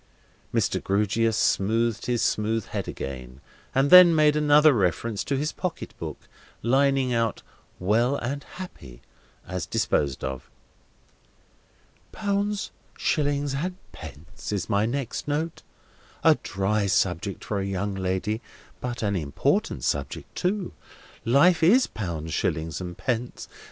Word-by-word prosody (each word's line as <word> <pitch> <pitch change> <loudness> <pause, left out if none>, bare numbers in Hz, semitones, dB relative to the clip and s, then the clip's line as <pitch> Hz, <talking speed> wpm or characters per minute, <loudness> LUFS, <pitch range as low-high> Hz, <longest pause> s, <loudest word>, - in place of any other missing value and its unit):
Mr. - - 0
Grewgious 105 +3 +1
smoothed 115 +3 +1
his 120 -2 +1
smooth 110 0 0
head - - -4
again, 65 -1 -7 0.4
and 135 +2 +3
then 180 -2 +10
made 150 -1 +4
another 150 0 +6
reference 100 +1 0
to 140 - -1
his 150 +3 -1
pocket 180 -2 -5
book; - - -5 0.5
lining 135 +1 +2
out 115 -2 0 0.3
"well 115 +8 +2
and 140 +2 -3
happy," 70 - -10 0.4
as 90 -3 -4
disposed 70 -3 0
of. 65 -1 -5 1.6
"'Pounds, 205 -1 -1 0.3
shillings, 145 -2 0
and 175 +7 -2 0.2
pence,' 95 +8 -9
is 100 -2 -2
my 105 0 +2
next 130 +1 -3
note. 155 +3 -2 0.6
A - - +7
dry 100 +1 0
subject 95 +1 0
for 105 - -2
a 95 - -2
young 100 +1 -2
lady, 95 +4 -2 0.4
but 120 -2 -4
an 100 -1 +1
important 75 -6 0
subject 70 -1 -3
too. 190 +1 -1 0.5
Life 145 +9 +5
is 220 +11 +6
pounds, 80 -6 -5
shillings, 80 +1 -1
and 90 -1 -6
pence. 120 -1 -3
115 Hz, 125 wpm, -25 LUFS, 95-145 Hz, 1.6 s, then